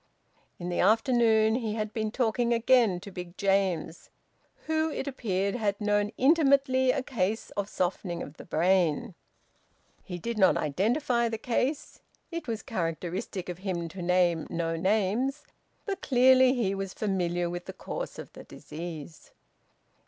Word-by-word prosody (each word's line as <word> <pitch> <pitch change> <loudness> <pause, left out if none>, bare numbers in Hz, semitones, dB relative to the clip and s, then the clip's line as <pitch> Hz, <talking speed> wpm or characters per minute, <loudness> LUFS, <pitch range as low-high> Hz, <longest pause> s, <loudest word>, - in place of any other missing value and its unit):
In 175 0 -5
the 175 - -2
afternoon 220 +1 +4
he 225 -3 -1
had 215 -1 -3
been 220 -1 -1
talking 235 0 +1
again 230 -5 +3
to 200 - -9
Big 180 -1 -8
James, 195 -4 0 0.6
who, 315 0 +1
it 290 - -4
appeared, 200 -7 -1
had 205 -4 -1
known 205 0 +1
intimately 270 -3 +4
a 255 - +1
case 220 -4 -2
of 200 0 -3
softening 175 -1 -2
of 145 - -11
the - - -9
brain. 180 +4 +1 0.9
He 180 - -6
did 230 +5 -4
not 190 - +5
identify 235 - +1
the 225 - -3
case 255 +5 -2 0.3
it 335 -3 -5
was 225 -2 -3
characteristic 180 +1 -3
of 180 -1 -6
him 180 -3 -3
to 185 +3 -8
name 175 -2 +2
no 165 -1 -2
names 215 - 0 0.4
but 395 -2 -3
clearly 260 0 +5
he 210 -6 0
was 195 -1 -5
familiar 175 -4 -1
with 175 +1 -5
the - - -6
course - - -6
of - - -9
the - - -11
disease. 160 -1 -9
205 Hz, 150 wpm, -28 LUFS, 180-245 Hz, 0.9 s, not